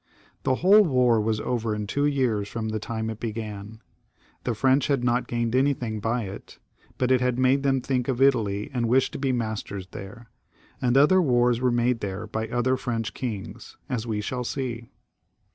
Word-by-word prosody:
The 130 Hz, -, +1 dB
whole 195 Hz, +8 st, +6 dB
war 125 Hz, -, +3 dB
was 110 Hz, 0 st, 0 dB
over 115 Hz, -2 st, -1 dB
in 105 Hz, 0 st, -3 dB
two 145 Hz, +7 st, 0 dB
years 120 Hz, -8 st, 0 dB
from 110 Hz, -1 st, -4 dB
the 110 Hz, 0 st, -2 dB
time 110 Hz, +1 st, -4 dB
when 110 Hz, -, -2 dB
it 110 Hz, -, -15 dB
began. 110 Hz, -1 st, -6 dB, 0.6 s
The 120 Hz, -, 0 dB
French 130 Hz, +4 st, +3 dB
had 140 Hz, -4 st, +1 dB
not 125 Hz, 0 st, +1 dB
gained 120 Hz, -1 st, -1 dB
anything 130 Hz, -5 st, +1 dB
by 115 Hz, +3 st, -1 dB
it, 95 Hz, 0 st, -9 dB, 0.4 s
but 130 Hz, 0 st, +1 dB
it 130 Hz, -1 st, +4 dB
had 125 Hz, -1 st, +1 dB
made 130 Hz, +2 st, +3 dB
them 135 Hz, -1 st, +1 dB
think 125 Hz, -2 st, -1 dB
of 130 Hz, -2 st, -1 dB
Italy, 110 Hz, -7 st, +2 dB
and 120 Hz, -3 st, 0 dB
wish 130 Hz, +2 st, +3 dB
to -, -, -6 dB
be 135 Hz, -1 st, 0 dB
masters 110 Hz, -5 st, -3 dB
there; 105 Hz, +4 st, -10 dB, 0.5 s
and 125 Hz, +1 st, +2 dB
other 165 Hz, +7 st, +6 dB
wars 120 Hz, -5 st, +2 dB
were 130 Hz, -, +3 dB
made 120 Hz, 0 st, +1 dB
there 100 Hz, -2 st, -4 dB
by 110 Hz, 0 st, -3 dB
other 125 Hz, +2 st, +1 dB
French 115 Hz, -4 st, -3 dB
kings, 110 Hz, -7 st, -6 dB
as 120 Hz, -2 st, -2 dB
we 105 Hz, -2 st, -1 dB
shall 125 Hz, +4 st, -3 dB
see. 120 Hz, -2 st, -4 dB
120 Hz, 195 wpm, -25 LUFS, 110-130 Hz, 0.6 s, whole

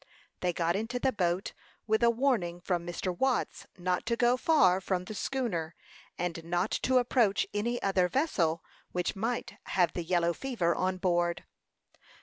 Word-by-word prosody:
They 180 Hz, -, +1 dB
got 170 Hz, 0 st, 0 dB
into 225 Hz, +4 st, -2 dB
the 260 Hz, +1 st, +1 dB
boat 185 Hz, -4 st, -1 dB, 0.3 s
with 220 Hz, +1 st, +1 dB
a 235 Hz, -, +6 dB
warning 230 Hz, -9 st, +1 dB
from 175 Hz, -1 st, -2 dB
Mr. 175 Hz, +1 st, -3 dB
Watts 265 Hz, +5 st, -1 dB
not 180 Hz, 0 st, -1 dB
to 235 Hz, -, +2 dB
go 240 Hz, +1 st, +3 dB
far 195 Hz, -, +4 dB
from 185 Hz, -1 st, -1 dB
the 215 Hz, -, -6 dB
schooner, 200 Hz, -9 st, -2 dB, 0.4 s
and 170 Hz, -1 st, -3 dB
not 175 Hz, +4 st, -1 dB
to 260 Hz, 0 st, +2 dB
approach 240 Hz, -4 st, +3 dB
any 235 Hz, +4 st, -1 dB
other 190 Hz, -2 st, +3 dB
vessel, 175 Hz, -, 0 dB, 0.3 s
which 180 Hz, -1 st, -1 dB
might 230 Hz, +5 st, -3 dB
have 175 Hz, -3 st, +1 dB
the 175 Hz, -, -2 dB
yellow 170 Hz, 0 st, +1 dB
fever 210 Hz, -8 st, 0 dB
on 185 Hz, 0 st, -1 dB
board. 175 Hz, -2 st, 0 dB
185 Hz, 160 wpm, -30 LUFS, 175-235 Hz, 0.4 s, a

